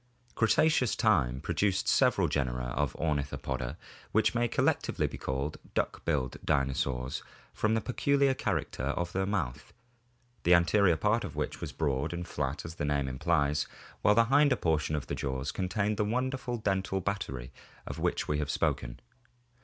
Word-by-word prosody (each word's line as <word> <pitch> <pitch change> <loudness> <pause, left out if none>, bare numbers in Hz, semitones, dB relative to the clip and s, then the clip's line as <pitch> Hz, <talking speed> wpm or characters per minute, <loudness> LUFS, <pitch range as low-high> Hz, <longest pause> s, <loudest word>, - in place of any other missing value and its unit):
Cretaceous 125 +2 +3
time 70 - +2
produced 100 -2 0
several - - +4
genera 60 -2 -1
of 75 - 0
Ornithopoda, 70 -5 -2 0.3
which 110 - +3
may 120 0 +2
collectively - - +1
be - - -5
called 70 +3 -2 0.2
duck - - -1
billed 70 -6 0
dinosaurs 65 -2 0 0.3
from 110 +1 +1
the 110 - +1
peculiar 140 +2 +2
character 130 - -2
of 85 +5 -1
the 95 0 -1
mouth, 85 -12 -3 0.7
the 90 +1 +6
anterior 85 0 +4
part 105 +7 +2
of 75 - -6
which 75 -1 -3
was - - -4
broad 75 0 -1
and 85 0 -4
flat 65 +4 -3
as 80 - -6
the 80 - -5
name 70 -2 0
implies 75 +2 +1 0.3
while 105 - +5
the 115 +1 +5
hinder 140 +2 +4
portion 80 -2 0
of 75 - -3
the - - -4
jaws 65 0 -2
con 95 -2 -3
tained 105 +1 0
the 105 - +2
wonderful 125 +2 -1
dental 95 -2 0
battery 75 -11 -3 0.3
of - - -6
which - - 0
we 75 0 0
have 75 -2 -2
spoken. - - -1
85 Hz, 160 wpm, -30 LUFS, 70-105 Hz, 0.7 s, the